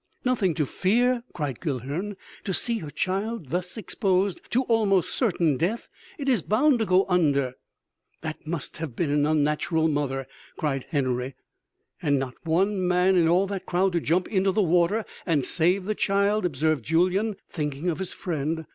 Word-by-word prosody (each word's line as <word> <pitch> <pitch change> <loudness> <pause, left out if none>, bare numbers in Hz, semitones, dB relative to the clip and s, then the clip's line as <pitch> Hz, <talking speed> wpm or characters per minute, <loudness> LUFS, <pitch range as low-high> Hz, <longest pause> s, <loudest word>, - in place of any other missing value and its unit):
"Nothing 210 -10 +1
to 150 - +1
fear!" 240 - +2
cried 145 -6 -4
Guilhern. 150 - -3 0.3
"To 190 - 0
see 235 -2 +1
her 155 - -7
child 195 - -2
thus 180 +4 -2
exposed 195 -3 0
to 255 +3 +2
almost 215 -6 +2
certain 170 - +1
death... 190 - -1 0.3
it 280 -3 -5
is 250 -8 +3
bound 250 - +3
to 220 - 0
go 185 +1 +4
under...." 145 -8 +2 0.7
"That 155 -1 -6
must 160 -2 -4
have 155 -7 -5
been 155 0 0
an 145 0 +2
unnatural 155 +2 +1
mother," 135 -3 -1 0.3
cried 135 -4 -2
Henory. 130 -3 -1 0.7
"And 145 -1 +2
not 130 -2 -3
one 185 +3 +1
man 180 +1 +3
in 170 -2 +4
all 180 +4 +4
that 195 -1 -5
crowd 185 +1 +1
to 170 - +2
jump 180 +4 +1
into 195 -2 +2
the 210 +2 +2
water 180 +5 +2 0.2
and 150 -6 +2
save 180 +3 +1
the 215 - 0
child!" 200 0 +1
observed 155 -3 0
Julyan 185 - +1 0.2
thinking 150 0 -3
of 170 -1 0
his 190 - -4
friend. 160 -1 -3
180 Hz, 170 wpm, -26 LUFS, 150-200 Hz, 0.7 s, go